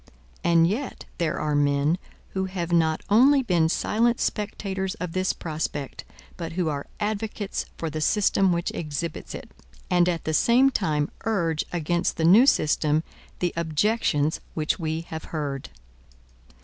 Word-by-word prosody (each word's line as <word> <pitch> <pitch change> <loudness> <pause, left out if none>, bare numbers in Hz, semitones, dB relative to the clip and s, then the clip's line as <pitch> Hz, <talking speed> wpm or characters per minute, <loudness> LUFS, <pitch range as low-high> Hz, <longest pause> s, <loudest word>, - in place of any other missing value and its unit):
And 170 -1 +5
yet 225 +10 -3
there 165 -3 0
are 150 -1 -1
men, 145 +3 +2 0.3
who 190 0 -2
have 180 -2 -4
not 160 -2 +2
only 265 +6 +5
been 170 -7 +2
silent 235 +7 +1
spectators 195 -2 -2
of 180 -5 -5
this 185 +2 +1
prospect, 150 -3 -4 0.3
but 165 -2 -5
who 175 -2 0
are 140 -2 -4
advocates 210 -1 -3
for 165 - -3
the 155 0 -4
system 195 +1 +3
which 170 0 -1
exhibits 155 +1 -5
it; - - -9 0.4
and, 175 0 +4
at 170 -2 -2
the 155 - -2
same 250 +10 +4
time, 150 - 0
urge 170 -8 0
against 175 +1 0
the 160 - +1
new 215 +10 +7
system 155 - +2 0.3
the 175 -1 -1
objections 160 -2 +1
which 155 +2 0
we 160 -1 -2
have 160 -1 -7
heard. 145 -4 -4
170 Hz, 150 wpm, -25 LUFS, 155-200 Hz, 0.4 s, new